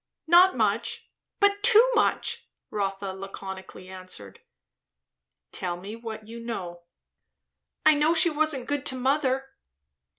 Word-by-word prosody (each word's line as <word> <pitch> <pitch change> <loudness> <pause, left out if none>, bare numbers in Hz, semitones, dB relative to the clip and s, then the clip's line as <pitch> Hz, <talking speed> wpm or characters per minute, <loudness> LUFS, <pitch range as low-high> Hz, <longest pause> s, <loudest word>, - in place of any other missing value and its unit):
"Not 345 -1 +6
much, 220 +1 -1 0.3
but 405 0 +3
too 440 +3 +7
much," - - 0 0.2
Rotha 195 -1 -3
laconically 190 -1 -9
answered. 185 - -7 1.1
"Tell 175 -1 -2
me 200 +5 -8
what 220 -2 -8
you 230 +1 -9
know." 185 -7 -6 1.0
"I 310 - +8
know 305 +3 +2
she 335 +1 +5
wasn't 300 -4 0
good 290 -2 -2
to 260 - 0
mother." 270 0 0
235 Hz, 120 wpm, -26 LUFS, 195-300 Hz, 1.1 s, I